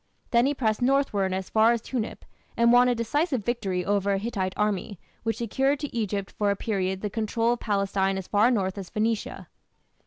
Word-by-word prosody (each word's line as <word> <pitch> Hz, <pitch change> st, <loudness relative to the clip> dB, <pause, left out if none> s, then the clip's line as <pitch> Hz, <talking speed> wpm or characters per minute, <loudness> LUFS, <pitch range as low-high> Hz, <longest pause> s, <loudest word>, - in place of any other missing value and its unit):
Then 235 Hz, +2 st, +4 dB
he 290 Hz, -, 0 dB
pressed 220 Hz, -4 st, 0 dB
northward 245 Hz, -7 st, +2 dB
as 190 Hz, 0 st, -4 dB
far 225 Hz, +2 st, +5 dB
as 235 Hz, -, -1 dB
Tunip, 240 Hz, -4 st, -4 dB, 0.3 s
and 235 Hz, 0 st, +5 dB
won 245 Hz, +1 st, +6 dB
a 245 Hz, -, +2 dB
decisive 260 Hz, -, -1 dB
victory 195 Hz, -7 st, -1 dB
over 200 Hz, 0 st, +1 dB
a -, -, +1 dB
Hittite 195 Hz, -3 st, -3 dB
army, 205 Hz, -2 st, -1 dB, 0.2 s
which 225 Hz, 0 st, -2 dB
secured 270 Hz, +5 st, 0 dB
to 290 Hz, -, -5 dB
Egypt 205 Hz, -3 st, -2 dB
for 205 Hz, -1 st, 0 dB
a 200 Hz, -, +2 dB
period 190 Hz, -3 st, -2 dB
the 210 Hz, -, -2 dB
control 225 Hz, +2 st, 0 dB
of 240 Hz, -, -5 dB
Palestine 195 Hz, -2 st, 0 dB
as 190 Hz, -, -6 dB
far 210 Hz, +3 st, +4 dB
north 200 Hz, -5 st, 0 dB
as 190 Hz, -, -7 dB
Phoenicia. 220 Hz, 0 st, -2 dB
215 Hz, 195 wpm, -26 LUFS, 195-235 Hz, 0.3 s, won